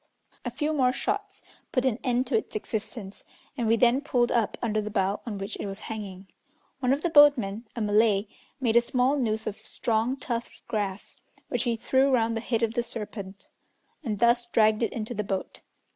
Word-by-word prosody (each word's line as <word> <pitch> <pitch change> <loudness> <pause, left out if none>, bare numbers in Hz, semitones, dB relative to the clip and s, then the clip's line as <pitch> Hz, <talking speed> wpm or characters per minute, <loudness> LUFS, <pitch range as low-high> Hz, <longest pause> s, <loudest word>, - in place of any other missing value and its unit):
A 245 - -2
few 295 +6 -1
more 255 -4 +3
shots 405 +8 -3 0.3
put 255 0 +1
an 250 -2 +1
end 250 0 +1
to 245 - -1
its 220 - -1
existence, 215 -1 -5 0.3
and 240 -5 -1
we 225 - +5
then 245 +3 +4
pulled 245 -5 +1
up 230 -3 +1
under 215 -2 0
the 210 - -4
bough 200 -1 0
on 210 -3 -3
which 195 +2 -4
it - - -3
was 195 0 -5
hanging. 200 -4 -7 0.5
One 255 -2 +1
of 280 +3 +1
the 345 - 0
boatmen, 250 -8 +5
a 235 - -3
Malay, 210 -1 +3 0.3
made 235 -4 +1
a 235 - +8
small 250 +3 +2
noose 220 -5 -1
of 210 - -3
strong, 230 +3 -1
tough 235 -2 -5
grass, 205 -2 -3 0.3
which - - 0
he 235 -1 +1
threw 265 +4 +2
round 230 -3 +2
the 225 - -2
head 230 -1 -1
of 225 -1 +1
the 240 - +1
serpent, 205 -4 -6 0.6
and 220 -6 -2
thus 235 +2 +3
dragged 215 -1 +3
it 230 - +1
into 225 +1 -4
the 210 -2 -2
boat. 195 -2 -4
230 Hz, 200 wpm, -27 LUFS, 215-250 Hz, 0.6 s, a